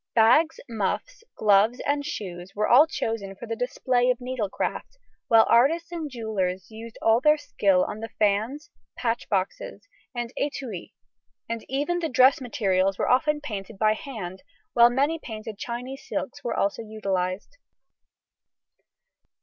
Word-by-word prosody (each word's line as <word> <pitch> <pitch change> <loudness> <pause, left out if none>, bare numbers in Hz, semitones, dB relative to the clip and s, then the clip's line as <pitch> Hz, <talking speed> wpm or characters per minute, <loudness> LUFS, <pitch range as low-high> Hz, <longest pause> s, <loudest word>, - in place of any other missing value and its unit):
Bags, 245 +9 +5
muffs, 235 - -3
gloves, 215 +3 +4
and 285 0 0
shoes 190 - -6
were 210 +1 +1
all 280 +6 +7
chosen 225 -9 -3
for 235 - -9
the 225 0 -3
display 245 0 0
of 250 - +2
needlecraft, 250 - -4 0.3
while 225 -1 +6
artists 325 +8 +3
and 325 -3 -4
jewellers 195 -7 -3
used 225 +1 -10
all 225 +2 +4
their 300 +1 +5
skill 195 -10 +2
on 210 - -5
the 225 +1 -6
fans, 220 +10 0 0.3
patch 235 -1 -2
boxes, 200 +1 -3 0.3
and 240 0 -4
étuis, 260 -10 -4 0.5
and 230 -1 -4
even 290 +7 0
the 325 -2 -2
dress 260 +3 +5
materials 195 -6 +1
were - - +1
often 295 +4 +2
painted 210 -6 -6
by 215 +1 +3
hand, 215 -7 -7 0.3
while 235 0 +7
many 285 +6 +1
painted 215 -4 -8
Chinese 250 +3 -6
silks 280 - -4
were 235 - -2
also 200 +3 0
utilised. 200 - -3
230 Hz, 140 wpm, -25 LUFS, 205-270 Hz, 0.5 s, all